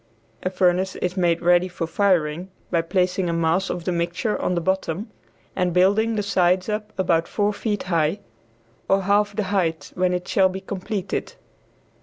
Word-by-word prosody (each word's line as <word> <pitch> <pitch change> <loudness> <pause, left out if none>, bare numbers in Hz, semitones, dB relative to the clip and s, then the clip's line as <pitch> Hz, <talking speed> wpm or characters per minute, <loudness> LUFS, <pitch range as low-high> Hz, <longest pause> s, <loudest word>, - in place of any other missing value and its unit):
A 185 - -1
furnace 185 0 +1
is 180 0 -2
made 175 -2 +1
ready 175 +1 +4
for 175 -2 -4
firing 175 -1 +1 0.2
by 170 -2 +2
placing 180 +1 0
a - - 0
mass 165 +3 +1
of 175 - -3
the 180 - -1
mixture 175 +5 -1
on 180 - 0
the - - +1
bottom, 190 +3 -2 0.4
and 180 -2 0
building 205 +5 +3
the 205 - 0
sides 185 -2 +2
up 210 0 -3
about 170 -3 +1
four 205 0 0
feet 205 0 -2
high 165 0 +1 0.7
(or 195 0 +3
half 205 +1 +2
the 215 - 0
height 165 -6 -1
when 180 0 +1
it 180 0 -2
shall 190 -1 +3
be 190 +1 -5
completed). 195 0 -4
185 Hz, 175 wpm, -23 LUFS, 175-200 Hz, 0.7 s, ready